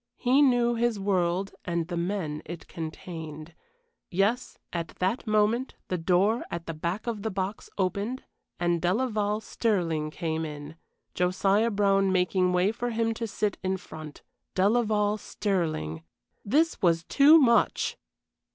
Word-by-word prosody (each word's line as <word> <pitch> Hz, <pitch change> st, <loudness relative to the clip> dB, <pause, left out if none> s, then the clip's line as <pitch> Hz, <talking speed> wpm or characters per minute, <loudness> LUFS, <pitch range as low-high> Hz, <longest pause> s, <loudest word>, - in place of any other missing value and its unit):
He 255 Hz, +3 st, +3 dB
knew 245 Hz, -3 st, +4 dB
his 235 Hz, -2 st, 0 dB
world 190 Hz, -1 st, 0 dB
and 170 Hz, -2 st, -2 dB
the 175 Hz, -, -4 dB
men 170 Hz, -4 st, -2 dB
it 170 Hz, +1 st, -8 dB
contained. 160 Hz, -1 st, -7 dB, 0.6 s
Yes, 205 Hz, +7 st, 0 dB, 0.2 s
at 170 Hz, -1 st, -2 dB
that 195 Hz, +6 st, -1 dB
moment 215 Hz, +4 st, +1 dB
the 180 Hz, -, 0 dB
door 190 Hz, +7 st, +2 dB
at 170 Hz, -1 st, -5 dB
the 165 Hz, -, -4 dB
back 170 Hz, +6 st, -3 dB
of 230 Hz, -4 st, -3 dB
the 220 Hz, -, -2 dB
box 195 Hz, +1 st, -4 dB
opened 200 Hz, +6 st, -1 dB, 0.4 s
and 175 Hz, -1 st, +1 dB
Delaval 210 Hz, +2 st, 0 dB
Stirling 170 Hz, -10 st, 0 dB
came 160 Hz, 0 st, -3 dB
in, 150 Hz, 0 st, -7 dB, 0.4 s
Josiah 195 Hz, +5 st, +2 dB
Brown 195 Hz, -2 st, +2 dB
making 180 Hz, 0 st, +2 dB
way 180 Hz, +3 st, +3 dB
for 240 Hz, +2 st, -3 dB
him 225 Hz, 0 st, 0 dB
to 230 Hz, +1 st, -4 dB
sit 210 Hz, -1 st, -2 dB
in 190 Hz, 0 st, 0 dB
front. 155 Hz, -4 st, -10 dB, 0.3 s
Delaval 210 Hz, +1 st, +2 dB
Stirling 160 Hz, -, -2 dB, 0.4 s
this 310 Hz, +9 st, +1 dB
was 165 Hz, -2 st, +3 dB
too 290 Hz, -, +6 dB
much! 235 Hz, -6 st, +3 dB
195 Hz, 140 wpm, -27 LUFS, 170-220 Hz, 0.6 s, too